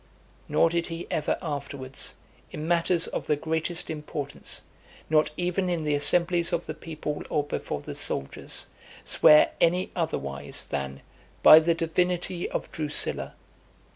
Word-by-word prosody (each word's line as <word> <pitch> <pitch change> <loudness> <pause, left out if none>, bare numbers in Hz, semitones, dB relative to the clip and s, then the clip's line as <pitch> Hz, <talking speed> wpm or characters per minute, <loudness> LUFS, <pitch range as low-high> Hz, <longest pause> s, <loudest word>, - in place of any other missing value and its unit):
Nor 165 - +3
did 170 0 0
he 165 0 -6
ever 150 - 0
afterwards, 140 -2 -4 0.4
in 155 - -5
matters 170 0 +2
of - - -5
the 150 - +3
greatest 160 +3 -2
importance, 150 -2 -4 0.5
not 155 -1 +4
even 180 +1 0
in 170 -3 -1
the 150 -1 0
assemblies 170 +4 +3
of 170 - -1
the - - -4
people 155 -2 -5
or 150 -2 +1
before 145 - -4
the - - -7
soldiers, 70 - -2 0.4
swear 150 0 +6
any 180 +2 +2
otherwise, 70 - -2
than 70 0 -4 0.4
"By 155 - +11
the 165 +1 +1
divinity 175 +2 -1
of - - -4
Drusilla." 150 -2 -2
160 Hz, 140 wpm, -27 LUFS, 150-170 Hz, 0.5 s, By